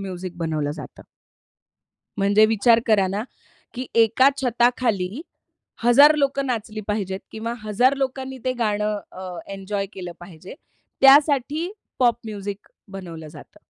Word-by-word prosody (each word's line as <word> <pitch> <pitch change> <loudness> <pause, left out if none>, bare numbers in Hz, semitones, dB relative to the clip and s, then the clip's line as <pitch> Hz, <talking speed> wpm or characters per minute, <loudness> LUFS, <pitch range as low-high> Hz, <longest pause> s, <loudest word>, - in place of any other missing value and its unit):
Music 185 -2 -6
बनवलं 155 -3 -2
जातं. 150 - -11 1.2
म्हणजे 200 +2 +4
विचार 225 +2 +4
करा 210 -4 +3
ना, 200 +3 -2 0.5
की 255 +1 -5 0.2
एका 230 +5 +4
छताखाली 240 -3 0 0.6
हजार 280 +6 +7
लोकं 275 -1 0
नाचली 220 -3 -3
पाहिजेत 195 -2 -2
किंवा 230 +2 -4
हजार 230 +6 +2
लोकांनी 265 -1 -3
ते 255 - +1
गाणं 210 -1 0
अ, 185 -2 -8
एन्जॉय 195 +1 -4
केलं 180 -2 -7
पाहिजे, 175 +3 -11 0.5
त्यासाठी 285 +4 +4 0.3
पॉप 240 -2 +3
म्युझिक 205 -1 -6 0.3
बनवलं 165 -5 -8
जातं. 150 -1 -14
215 Hz, 125 wpm, -22 LUFS, 190-255 Hz, 1.2 s, हजार